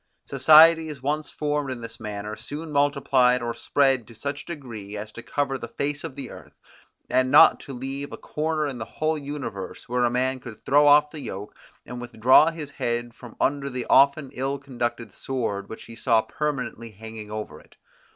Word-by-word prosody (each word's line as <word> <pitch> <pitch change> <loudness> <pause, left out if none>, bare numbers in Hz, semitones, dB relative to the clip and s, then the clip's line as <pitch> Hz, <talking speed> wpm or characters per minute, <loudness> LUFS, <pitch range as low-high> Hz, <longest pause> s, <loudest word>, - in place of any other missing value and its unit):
Societies 155 +1 +6
once 150 +2 -1
formed 150 -2 -2
in 130 -2 -5
this 115 0 -8
manner, 105 -1 -5
soon 155 +7 -7
multiplied 140 -3 +3
or 120 0 -2
spread 135 -1 +1
to 115 - -14
such 140 +5 -4
a - - -16
degree, 115 -10 -7
as 105 +1 -7
to 120 - -9
cover 135 +1 -2
the 115 - -6
face 145 +4 -3
of 160 -5 -6
the 135 -3 -7
earth; - - -13 0.5
and 130 +1 +2
not - - +7
to 140 - -9
leave 135 +3 -5
a - - -7
corner 155 0 -2
in 135 -4 -4
the 110 - -4
whole 155 +1 -1
universe, 140 -9 -6
where 125 +1 0
a 120 - +3
man 130 +2 0
could 120 -3 -11
throw 145 +1 +5
off 150 +1 +6
the 155 - -7
yoke, 105 -5 -7 0.3
and 125 0 -7
withdraw 120 +5 +5
his 155 -3 -7
head 120 -1 -3
from 120 -1 -13
under 140 0 0
the 125 -2 -4
often 140 0 +4
ill 135 +2 -2
conducted 120 -5 -4
sword 105 -7 -3
which 110 - -9
he 115 - -11
saw 115 -1 +2
perpetually 130 -6 -4
hanging 110 0 -10
over 105 0 -6
it. - - -22
130 Hz, 190 wpm, -25 LUFS, 115-145 Hz, 0.5 s, not